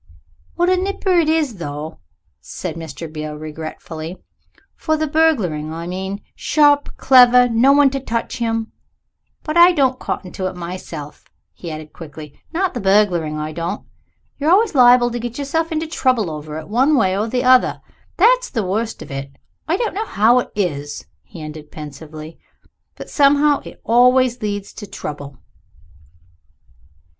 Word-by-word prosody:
"What 350 Hz, +1 st, +2 dB
a 370 Hz, -, +3 dB
nipper 385 Hz, 0 st, -1 dB
it 315 Hz, -2 st, +2 dB
is, 305 Hz, -9 st, 0 dB
though!" 155 Hz, -1 st, -6 dB, 0.4 s
said 180 Hz, -, -6 dB
Mr. 165 Hz, -1 st, -7 dB
Beale 155 Hz, -1 st, -5 dB
regretfully. 155 Hz, +2 st, -7 dB, 0.6 s
"For 315 Hz, -1 st, -1 dB
the 310 Hz, -, 0 dB
burgling, 235 Hz, -, +1 dB
I 165 Hz, +1 st, -6 dB
mean 190 Hz, +3 st, -5 dB
sharp 290 Hz, -1 st, +2 dB
clever 250 Hz, -1 st, +6 dB
no 240 Hz, +3 st, +4 dB
one 280 Hz, -1 st, +5 dB
to 275 Hz, -, -2 dB
touch 235 Hz, -1 st, -3 dB
him. 225 Hz, -2 st, -2 dB, 0.7 s
But 310 Hz, +2 st, -2 dB
I 350 Hz, +1 st, +8 dB
don't 265 Hz, -5 st, +1 dB
cotton 180 Hz, -, -4 dB
to 185 Hz, -, -3 dB
it 185 Hz, -, -6 dB
myself," 170 Hz, -4 st, -8 dB, 0.3 s
he 170 Hz, -, -8 dB
added 155 Hz, -1 st, -8 dB
quickly, 150 Hz, -2 st, -10 dB, 0.2 s
"not 360 Hz, +2 st, -1 dB
the 245 Hz, -, -4 dB
burgling, 190 Hz, -6 st, +2 dB
I 155 Hz, 0 st, -4 dB
don't. 170 Hz, +5 st, -4 dB, 0.5 s
You're 295 Hz, +2 st, +1 dB
always 405 Hz, +4 st, +4 dB
liable 245 Hz, -2 st, +6 dB
to 240 Hz, -, -3 dB
get 240 Hz, 0 st, -5 dB
yourself 320 Hz, +4 st, -2 dB
into 320 Hz, 0 st, -1 dB
trouble 255 Hz, -, 0 dB
over 150 Hz, 0 st, -7 dB
it, 160 Hz, -, -8 dB
one 260 Hz, +8 st, +3 dB
way 190 Hz, -5 st, +2 dB
or 210 Hz, +3 st, -1 dB
the 250 Hz, +2 st, -1 dB
other 255 Hz, 0 st, +4 dB, 0.4 s
that's -, -, +4 dB
the 225 Hz, -6 st, -2 dB
worst 220 Hz, +4 st, -2 dB
of -, -, -12 dB
it. 135 Hz, 0 st, -5 dB, 0.4 s
I 335 Hz, +3 st, +1 dB
don't 455 Hz, 0 st, -2 dB
know 430 Hz, +3 st, -3 dB
how 225 Hz, +4 st, +4 dB
it -, -, -4 dB
is," 145 Hz, -8 st, -3 dB, 0.2 s
he 170 Hz, -5 st, -11 dB
ended 150 Hz, 0 st, -9 dB
pensively, 155 Hz, +1 st, -10 dB, 0.6 s
"but -, -, -9 dB
somehow 290 Hz, 0 st, +3 dB
it -, -, -12 dB
always 250 Hz, +2 st, +4 dB
leads 205 Hz, -2 st, -4 dB
to 205 Hz, -, -9 dB
trouble." 145 Hz, -6 st, -7 dB
225 Hz, 160 wpm, -19 LUFS, -, 0.7 s, I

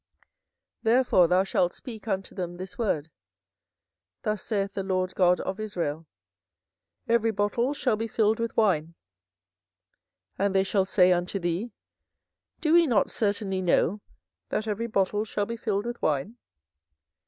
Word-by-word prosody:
24:013:012 -, -, -57 dB
Therefore 245 Hz, -9 st, +4 dB
thou 180 Hz, +2 st, +3 dB
shalt 180 Hz, -2 st, +1 dB
speak 225 Hz, -3 st, -9 dB
unto 195 Hz, -2 st, -2 dB
them 175 Hz, -2 st, -5 dB
this 185 Hz, +1 st, -7 dB
word; 165 Hz, -9 st, -1 dB, 1.1 s
Thus 215 Hz, -2 st, -1 dB
saith 200 Hz, -3 st, -2 dB
the 195 Hz, -, -2 dB
LORD 185 Hz, -1 st, -1 dB
God 180 Hz, -1 st, +3 dB
of 190 Hz, +2 st, -4 dB
Israel, 165 Hz, -7 st, -3 dB, 1.0 s
Every 230 Hz, -1 st, +3 dB
bottle 225 Hz, +6 st, 0 dB
shall 250 Hz, -5 st, +1 dB
be 225 Hz, +1 st, -2 dB
filled 220 Hz, 0 st, +1 dB
with 230 Hz, 0 st, -3 dB
wine: 170 Hz, -7 st, +2 dB, 1.4 s
and 200 Hz, 0 st, +1 dB
they 190 Hz, -, +4 dB
shall 195 Hz, 0 st, +1 dB
say 185 Hz, -2 st, +4 dB
unto 180 Hz, +2 st, 0 dB
thee, 180 Hz, +6 st, -2 dB, 0.9 s
Do 310 Hz, -1 st, +2 dB
we 340 Hz, -1 st, +6 dB
not 230 Hz, -6 st, +2 dB
certainly 200 Hz, -3 st, -1 dB
know 185 Hz, +2 st, +2 dB, 0.5 s
that 215 Hz, -, -1 dB
every 220 Hz, +2 st, -2 dB
bottle 205 Hz, -1 st, +1 dB
shall 205 Hz, -1 st, -2 dB
be 230 Hz, -, -4 dB
filled 210 Hz, -2 st, -2 dB
with 240 Hz, 0 st, -5 dB
wine? 155 Hz, -, -1 dB
200 Hz, 145 wpm, -27 LUFS, 185-225 Hz, 1.4 s, we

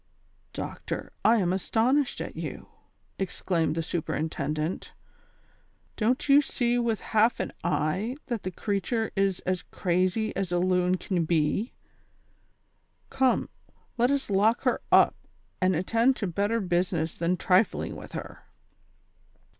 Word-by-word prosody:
" -, -, -39 dB
Doctor, -, -, -5 dB
I 225 Hz, -, +6 dB
am 185 Hz, -5 st, +1 dB
astonished 245 Hz, +8 st, +1 dB
at -, -, -6 dB
you," -, -, -6 dB, 0.5 s
exclaimed 180 Hz, -4 st, -1 dB
the 165 Hz, -, -1 dB
super 165 Hz, 0 st, -3 dB
intendent; 155 Hz, +1 st, -3 dB, 1.0 s
"don't 245 Hz, +6 st, 0 dB
you 280 Hz, +1 st, +7 dB
see 245 Hz, -3 st, 0 dB
with 230 Hz, -3 st, 0 dB
half 220 Hz, +2 st, +2 dB
an -, -, -3 dB
eye 175 Hz, -, 0 dB
that 235 Hz, -5 st, -3 dB
the 185 Hz, -, -3 dB
creature 205 Hz, +4 st, -2 dB
is 195 Hz, -2 st, +1 dB
as 185 Hz, 0 st, -1 dB
crazy 185 Hz, +5 st, 0 dB
as 195 Hz, -2 st, -2 dB
a 175 Hz, -, +2 dB
loon 180 Hz, 0 st, +2 dB
can 175 Hz, -3 st, -1 dB
be; 165 Hz, -, 0 dB, 1.4 s
come, 265 Hz, -2 st, +2 dB, 0.5 s
let 245 Hz, 0 st, +3 dB
us 280 Hz, -6 st, -1 dB
lock 210 Hz, +4 st, +3 dB
her -, -, +1 dB
up, -, -, +6 dB, 0.5 s
and 185 Hz, 0 st, +3 dB
attend 230 Hz, +9 st, +2 dB
to 210 Hz, -, -3 dB
better 200 Hz, +5 st, 0 dB
business 175 Hz, -4 st, 0 dB
than 170 Hz, +2 st, 0 dB
trifling 185 Hz, +4 st, +2 dB
with -, -, -10 dB
her." -, -, -8 dB
195 Hz, 135 wpm, -27 LUFS, 175-230 Hz, 1.4 s, you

